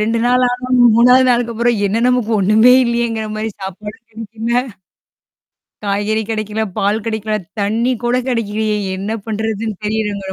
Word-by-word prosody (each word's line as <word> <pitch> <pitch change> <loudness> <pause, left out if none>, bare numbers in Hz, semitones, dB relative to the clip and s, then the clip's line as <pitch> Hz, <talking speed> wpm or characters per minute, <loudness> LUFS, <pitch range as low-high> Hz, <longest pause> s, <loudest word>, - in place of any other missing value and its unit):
2 225 +2 0
நாளாகவும், 250 0 +1 0.2
3 250 +2 +5
நாளுக்கப்புறம் 235 -1 0
என்ன 205 +3 0
நமக்கு 250 -3 0
ஒண்ணுமே 220 +6 +5
இல்லையேங்கிற 235 -2 -1
மாரி 220 +1 -3
சாப்பாடும் 210 +4 -8
கெடைக்கல. 225 +2 -3 1.2
காய்கறி 205 +2 -1
கெடைக்கல, 215 -1 -3 0.2
பால் 205 +2 0
கெடைக்கல, 220 -1 -3 0.3
தண்ணி 225 +5 0
கூட 240 +1 +1
கெடைக்கலையே 215 -3 -1 0.2
என்ன 195 +3 -5 0.2
பண்ணுறதுன்னு 220 0 -3
தெரியலங்கிற 210 -2 -2
220 Hz, 120 wpm, -17 LUFS, 210-235 Hz, 1.2 s, 3